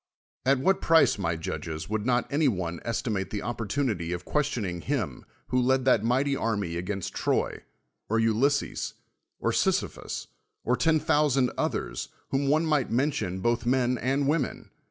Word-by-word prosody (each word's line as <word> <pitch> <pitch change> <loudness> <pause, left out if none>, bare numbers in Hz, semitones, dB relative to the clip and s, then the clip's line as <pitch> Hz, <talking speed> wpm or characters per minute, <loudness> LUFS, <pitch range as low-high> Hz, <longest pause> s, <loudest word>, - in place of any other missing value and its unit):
At 135 +1 +5
what 190 +9 +2
j)rice, 165 -9 +4
my 85 -3 0
judges, 80 -1 -5
would 110 +2 -2
not 120 -1 +2
any 150 +1 +3
one 90 -7 -1
estimate 110 -4 -2
the 105 - -3
oppor 115 +1 -4
tunity 100 -9 -1
of 90 - -9
(|uestioning 120 - -1
him 110 - -2 0.2
who 125 0 +2
led 130 +1 +2
that 120 -5 +4
mighty 135 +4 +2
army 100 -9 -1
against 90 +2 -3
Troy, - - 0 0.5
or 115 - +2
Ulysses, 115 +6 +1 0.4
or - - 0
Sisyphus, - - -1 0.4
or 125 - +2
ten 160 +3 +3
thousand 140 -4 +2
others, - - -2 0.2
whom 140 +1 +1
one 155 +4 +3
might 150 -5 +1
mention, 115 -8 0
botli 120 0 +1
men 125 -1 +2
and 135 +2 +1
women? 150 -3 -1
120 Hz, 155 wpm, -27 LUFS, 100-140 Hz, 0.5 s, At